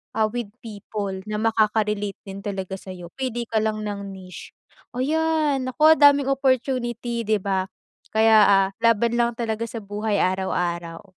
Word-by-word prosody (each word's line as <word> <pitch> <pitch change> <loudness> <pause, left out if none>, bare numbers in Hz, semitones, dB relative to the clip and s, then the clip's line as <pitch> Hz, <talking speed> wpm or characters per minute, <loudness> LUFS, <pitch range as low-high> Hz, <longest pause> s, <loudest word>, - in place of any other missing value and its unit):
ah, 215 -1 +1
with 240 -2 -3 0.2
people 205 -2 -5
na 210 - -3
makaka-relate 210 -2 +1
din 195 0 -8
talaga 190 -1 -5
sa'yo 180 -2 -10
pili 240 -2 -2
ka 225 -1 -1
lang 215 0 -1
ng 200 -2 -5
niche. 185 -1 -11 0.4
Ayan, 300 -1 +1
nako 310 +5 +4
daming 285 -1 +5
opportunity, 245 -3 -1
di 215 - +3
ba? 190 -1 -1 0.5
Kaya, 220 0 +5
ah, 195 -1 +5
laban 230 +1 +2
lang 235 -1 +1
talaga 230 -1 -3
sa 225 -2 -7
buhay 205 +1 -2
araw-araw. 175 -2 -2
220 Hz, 145 wpm, -23 LUFS, 200-240 Hz, 0.5 s, daming